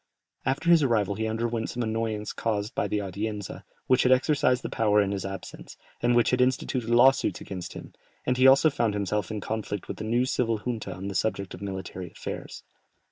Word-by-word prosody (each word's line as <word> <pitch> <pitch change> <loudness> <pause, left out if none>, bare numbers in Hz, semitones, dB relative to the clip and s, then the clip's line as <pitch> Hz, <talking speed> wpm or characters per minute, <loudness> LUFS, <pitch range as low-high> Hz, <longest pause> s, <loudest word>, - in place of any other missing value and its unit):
After 145 +6 +2
his 170 -2 +7
arrival 110 -7 +2
he 110 +2 -2
underwent 115 +1 -2
some 125 - -3
annoyance 110 -1 -2
caused 105 +1 -2
by - - 0
the - - -1
Audienza, 100 +1 -5 0.2
which 130 -1 +4
had 125 - +3
exercised 130 -1 +3
the - - -2
power 105 -2 +2
in 100 -1 +2
his 100 -1 -3
absence, 95 0 -9 0.2
and 120 0 +3
which 120 - +4
had 125 0 +2
instituted 125 -2 0
law 120 +3 +7
suits - - -3
against 90 -3 -7
him, - - -10 0.3
and 125 - +1
he 130 +1 +5
also 135 +4 +6
found 115 -5 0
himself 100 -1 -1
in 105 -1 -4
conflict 105 -2 -4
with - - -5
the - - -5
new 120 +3 +1
civil 115 -3 0
junta 110 -2 -4
on 95 +2 -6
the 100 - -4
subject 100 0 -1
of - - -9
military 95 -2 -5
affairs. - - -7
110 Hz, 205 wpm, -27 LUFS, 100-125 Hz, 0.3 s, his